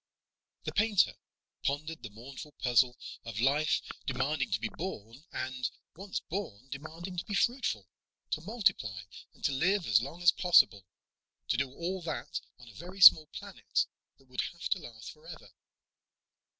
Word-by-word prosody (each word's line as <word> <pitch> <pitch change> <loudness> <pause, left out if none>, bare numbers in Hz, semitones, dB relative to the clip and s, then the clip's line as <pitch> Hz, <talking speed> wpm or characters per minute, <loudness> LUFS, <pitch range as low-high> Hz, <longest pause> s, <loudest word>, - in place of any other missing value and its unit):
The - - -3
painter 210 -2 +3 0.5
pondered 155 +3 -2
the 110 - -7
mournful 135 +7 -10
puzzle 125 0 +3 0.3
of 115 -2 -5
life 140 +5 +2 0.2
demanding 135 +2 0
to - - 0
be 115 - -1
born 135 - -7
and, 130 -1 -2 0.3
once 195 +3 -4
born, 135 - -5
demanding 165 +6 -7
to - - -5
be 205 - -3
fruitful... 195 - +1 0.4
to 155 - 0
multiply 170 - 0 0.3
and - - -21
to - - +3
live 180 +7 +2
as 110 0 +5
long 165 +8 -7
as 175 - +8
possible 105 - +4 0.6
to - - +3
do 135 0 0
all 180 +6 -3
that 165 - -4 0.2
on 125 - -15
a 115 - -13
very 180 - -9
small 155 -4 +10
planet - - -2 0.3
that 135 - -24
would 125 -1 -2
have 170 - -5
to 190 - +2
last 115 -8 -9
forever. 155 +1 -12
150 Hz, 155 wpm, -31 LUFS, 125-175 Hz, 0.6 s, small